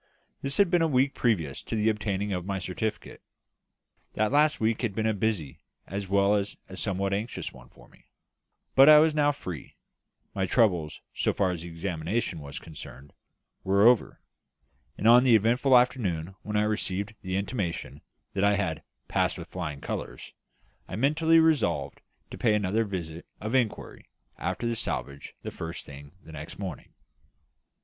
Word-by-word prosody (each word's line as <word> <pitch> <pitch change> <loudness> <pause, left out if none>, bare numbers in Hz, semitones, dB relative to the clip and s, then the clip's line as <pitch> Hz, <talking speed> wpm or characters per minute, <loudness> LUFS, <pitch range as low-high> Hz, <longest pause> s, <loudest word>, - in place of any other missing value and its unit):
This 140 0 -1
had 200 -4 +4
been 175 -2 +4
a 165 - +3
week 135 -1 +2
previous 85 - 0
to - - -5
the 110 0 +1
obtaining 105 -2 -1
of 90 -1 -2
my 95 +1 -3
certificate. 95 +4 -4 0.9
That 110 +1 +1
last 150 +2 +3
week 110 0 +1
had 110 -6 -2
been 110 - -1
a 110 - +2
busy 100 -9 -2 0.3
as 100 0 -5
well 100 +1 +3
as 100 -1 -1
a 95 - -9
somewhat 95 0 -1
anxious 105 +4 -3
one 65 -1 -15
for - - -18
me; - - -24 0.7
but 135 +2 +8
I 155 - +10
was 155 +1 +5
now 145 -1 +3
free; 90 - -8 0.6
my 95 -1 -1
troubles, 90 -9 +1
so - - 0
far 95 -2 +1
as 85 -2 -4
the 85 - -7
examination 85 +2 -3
was 70 -1 -7
concerned, 70 -3 -10 0.5
were 100 +2 +3
over; 120 -1 +4 0.8
and 110 - 0
on 120 +2 +8
the 125 -3 +6
eventful 125 +5 +4
afternoon, 95 -9 0
when 105 0 -3
I 105 - +3
received 105 -1 -2
the 95 -1 -3
intimation 90 - -3 0.3
that 100 - 0
I 100 0 +4
had 90 -6 -2 0.3
"passed - - 0
with - - -9
flying 75 -6 -5
colours," - - -6 0.5
I - - -6
mentally 155 +7 +3
resolved 85 - +2 0.3
to - - -8
pay 110 -3 +3
another 105 +2 +1
visit 85 -5 -6
of 110 +3 -4
inquiry 125 -5 -1 0.3
after - - -3
the 115 0 0
salvage 70 - -4
the - - -5
first 80 +1 -6
thing 70 +1 -12
the - - -12
next 75 0 -8
morning. 95 -8 -7
100 Hz, 170 wpm, -27 LUFS, 85-115 Hz, 0.9 s, I